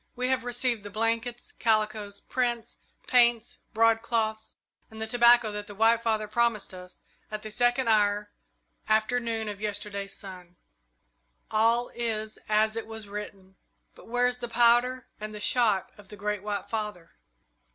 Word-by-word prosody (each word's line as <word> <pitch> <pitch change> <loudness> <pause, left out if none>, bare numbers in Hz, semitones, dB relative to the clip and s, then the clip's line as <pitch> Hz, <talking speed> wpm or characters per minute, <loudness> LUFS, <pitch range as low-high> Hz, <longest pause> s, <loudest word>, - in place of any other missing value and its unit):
"We 250 +1 -1
have 260 -1 +1
received 245 -2 0
the 205 - -8
blankets, 230 +3 -2
calicoes, 215 -2 0
prints, 240 -2 -2 0.3
paints, 240 -2 +3
broadcloths, 225 -1 +1 0.3
and 220 - -11
the 220 - -2
tobacco 235 -1 +5
that 205 0 -6
the 205 - -10
White 225 +2 +4
Father 220 -2 0
promised 230 -3 0
us 180 0 -11 0.3
at 215 0 -5
the 215 - -7
second 245 +3 +2
hour 205 -1 +2 0.6
after 220 +3 +3
noon 225 -2 -2
of 205 -1 -6
yesterday's 205 -1 -3
sun. 180 -2 -10 1.0
All 230 +2 +3
is 220 -2 -3
as 215 +1 +3
it 225 - -4
was 220 -2 -8
written. 200 -2 -8 0.4
But - - -16
where 245 +2 +1
is 250 0 0
the 240 - -4
powder 240 +2 +3
and 215 0 -6
shot 220 -6 +2
of 205 - -15
the - - -9
Great 210 0 -2
White 205 -1 -3
Father? 210 -6 -4
220 Hz, 150 wpm, -28 LUFS, 210-235 Hz, 1.0 s, tobacco